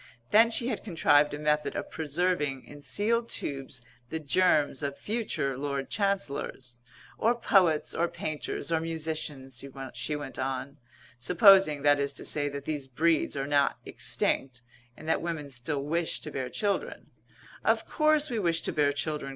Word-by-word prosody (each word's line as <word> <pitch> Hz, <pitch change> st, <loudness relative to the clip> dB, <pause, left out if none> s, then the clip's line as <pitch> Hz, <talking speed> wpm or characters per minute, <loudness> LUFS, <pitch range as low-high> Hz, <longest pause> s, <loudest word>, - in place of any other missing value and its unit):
Then 225 Hz, +2 st, +7 dB
she 235 Hz, +1 st, +2 dB
had -, -, -3 dB
contrived 150 Hz, -6 st, +3 dB
a 145 Hz, -, -4 dB
method 150 Hz, 0 st, 0 dB
of -, -, -4 dB
preserving 150 Hz, -3 st, -1 dB
in 145 Hz, 0 st, -12 dB
sealed 230 Hz, +9 st, 0 dB
tubes 135 Hz, -3 st, -3 dB, 0.3 s
the 160 Hz, -, -2 dB
germs 155 Hz, -2 st, +2 dB
of 140 Hz, -1 st, -3 dB
future 210 Hz, -, -2 dB
Lord 140 Hz, 0 st, -3 dB
Chancellors 145 Hz, -, -2 dB, 0.4 s
"or 235 Hz, +2 st, +3 dB
poets 180 Hz, -9 st, +3 dB
or 170 Hz, -, +1 dB
painters 155 Hz, +1 st, -4 dB
or 165 Hz, -, +3 dB
musicians," 155 Hz, -5 st, -4 dB, 0.4 s
she 150 Hz, -, -2 dB
went 145 Hz, -3 st, -6 dB
on, 135 Hz, +2 st, -3 dB, 0.4 s
"supposing, 175 Hz, -, +6 dB
that 145 Hz, 0 st, +5 dB
is 140 Hz, 0 st, 0 dB
to -, -, -8 dB
say, 145 Hz, -1 st, +1 dB
that 140 Hz, 0 st, -7 dB
these 145 Hz, -3 st, -3 dB
breeds 155 Hz, +3 st, +1 dB
are 135 Hz, -, -1 dB
not 145 Hz, -1 st, +2 dB
extinct, 125 Hz, -2 st, -1 dB, 0.3 s
and 155 Hz, -, -11 dB
that 160 Hz, -, +1 dB
women 160 Hz, -4 st, -4 dB
still 135 Hz, +3 st, -2 dB
wish 165 Hz, +3 st, -1 dB
to 150 Hz, -, -6 dB
bear 130 Hz, -2 st, -3 dB
children 200 Hz, +7 st, -2 dB, 0.3 s
" -, -, -23 dB, 0.2 s
"Of -, -, +2 dB
course 305 Hz, -2 st, +2 dB
we 230 Hz, -, -1 dB
wish 170 Hz, -4 st, +1 dB
to -, -, -2 dB
bear 145 Hz, -1 st, +3 dB
children!" 150 Hz, -1 st, -3 dB
150 Hz, 165 wpm, -28 LUFS, 140-175 Hz, 0.4 s, Then